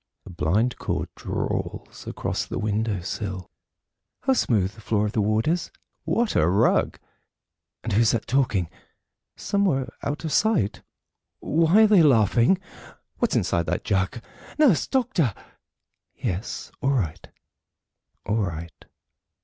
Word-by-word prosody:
A - - -10
blind 100 +10 0
cord - - -2
drawls - - -4
across - - -3
the - - -4
window 105 -2 -1
sill... 95 0 -5 0.7
How 265 - +2
smooth 105 - +1
the 110 - -14
floor 105 -1 0
of 105 - -2
the 110 - 0
ward 110 +3 +1
is! 170 +2 0 0.4
what 235 -1 0
a 75 - +4
rug! 95 +4 +2 0.9
And - - -2
who's 110 +2 +4
that 115 - 0
talking, 125 -10 +1 0.7
somewhere 185 -10 0
out 150 +3 -3
of 160 - -2
sight? 200 - +1 0.6
Why 165 +7 +4
are - - +7
they 205 -4 +6
laughing? 120 - +4 0.6
What's - - +1
inside 85 -1 +1
that - - -1
jug? 95 +5 0 0.4
"Nurse! 270 - +4
Doctor!" 235 - +1 0.8
"Yes; 95 +6 -4
all 140 0 +2
right, 85 - -2 1.0
all 105 +2 0
right." 85 -6 -4
115 Hz, 130 wpm, -24 LUFS, 100-160 Hz, 1.0 s, are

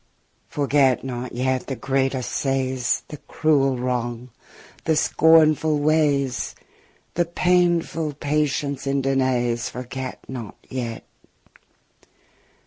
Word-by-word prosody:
Forget 140 -3 +2
not 125 -1 -5
yet 130 +1 -1
the 135 - -3
great 135 +1 0
assays*, 130 -2 -3 0.3
{trials, 130 -1 -1
tests} 125 -1 0
The 150 - -7
cruel 140 -4 +2
wrongs, 120 -1 -3 0.6
the 160 - +2
scornful 155 -1 +4
ways, 145 -3 +1 0.6
The 175 - +1
painful 170 -2 +1
patience 145 -1 -1
in 135 0 0
denays, 125 -3 +1
Forget 130 +1 -7
not 120 -6 -7
yet. 120 -3 -4
135 Hz, 105 wpm, -23 LUFS, 125-150 Hz, 0.6 s, scornful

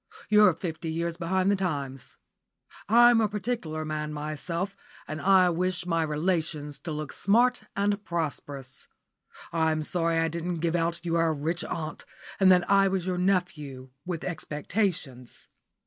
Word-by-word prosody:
You're 210 -4 +6
fifty 165 -2 -4
years 170 +1 -2
behind 185 +3 +1
the - - +3
times. 140 -9 -4 0.7
I'm 240 +1 +7
a 215 - +2
particular 200 -7 -3
man 155 0 -3
myself, 160 +6 -4 0.3
and 155 0 -5
I 185 -2 +5
wish 180 +1 -1
my 165 -2 +1
relations 155 -2 -1
to 165 - -6
look 150 -1 -4
smart 240 +2 +2
and 205 +1 0
prosperous. 140 -6 -5 0.7
I'm 160 -1 +1
sorry 165 0 +1
I 165 0 +2
didn't 170 +2 -3
give 165 +1 0
out 170 +1 -1
you 165 - -1
were 165 0 +3
a 160 - +2
rich 160 +4 -2
aunt, 155 -2 -5 0.3
and 190 -1 +7
that 180 -1 +4
I 195 0 +5
was 190 -2 -1
your 180 -1 -1
nephew, 150 -9 -1
with 175 -3 -4
expectations. 155 - -3
170 Hz, 150 wpm, -27 LUFS, 155-185 Hz, 0.7 s, I'm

